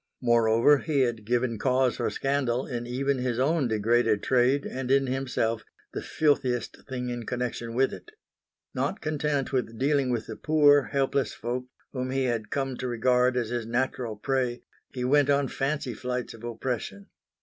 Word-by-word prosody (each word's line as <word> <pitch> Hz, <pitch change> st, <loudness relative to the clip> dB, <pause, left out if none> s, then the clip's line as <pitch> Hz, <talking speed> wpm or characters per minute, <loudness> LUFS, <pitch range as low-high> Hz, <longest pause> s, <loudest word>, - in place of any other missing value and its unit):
Moreover, 120 Hz, +4 st, +4 dB
he 145 Hz, -2 st, 0 dB
had 115 Hz, -4 st, -1 dB
given 120 Hz, -1 st, 0 dB
cause 130 Hz, +1 st, +2 dB
for -, -, 0 dB
scandal 135 Hz, -3 st, 0 dB
in 120 Hz, -2 st, -4 dB
even 135 Hz, +2 st, 0 dB
his 125 Hz, -2 st, -1 dB
own 140 Hz, +2 st, +2 dB
degraded 110 Hz, 0 st, +2 dB
trade 130 Hz, +2 st, +2 dB
and 130 Hz, -1 st, -4 dB
in 135 Hz, 0 st, +4 dB
himself, 125 Hz, -4 st, -1 dB, 0.3 s
the -, -, -3 dB
filthiest 130 Hz, -6 st, 0 dB
thing 125 Hz, -1 st, -3 dB
in 120 Hz, -1 st, -5 dB
connection 120 Hz, -2 st, -3 dB
with 135 Hz, +2 st, +2 dB
it. -, -, -10 dB, 0.6 s
Not 195 Hz, -, -1 dB
content 150 Hz, -3 st, -1 dB
with 115 Hz, -3 st, -1 dB
dealing 140 Hz, 0 st, +2 dB
with 120 Hz, -3 st, -1 dB
the 110 Hz, -, -7 dB
poor, 145 Hz, -3 st, +4 dB
helpless 135 Hz, -3 st, 0 dB
folk, 125 Hz, +2 st, -4 dB, 0.2 s
whom 130 Hz, -1 st, -3 dB
he 135 Hz, 0 st, 0 dB
had 115 Hz, -4 st, -1 dB
come 135 Hz, -2 st, -2 dB
to 130 Hz, -, -3 dB
regard 125 Hz, +1 st, +2 dB
as 120 Hz, -3 st, -1 dB
his 120 Hz, -2 st, -3 dB
natural 120 Hz, -1 st, -1 dB
prey, 125 Hz, +1 st, -1 dB, 0.3 s
he 125 Hz, -, -4 dB
went 145 Hz, +2 st, +3 dB
on 140 Hz, -1 st, +3 dB
fancy 135 Hz, -1 st, -2 dB
flights 125 Hz, +2 st, -4 dB
of 115 Hz, -, -13 dB
oppression. 115 Hz, -4 st, -4 dB
125 Hz, 170 wpm, -27 LUFS, 120-135 Hz, 0.6 s, Moreover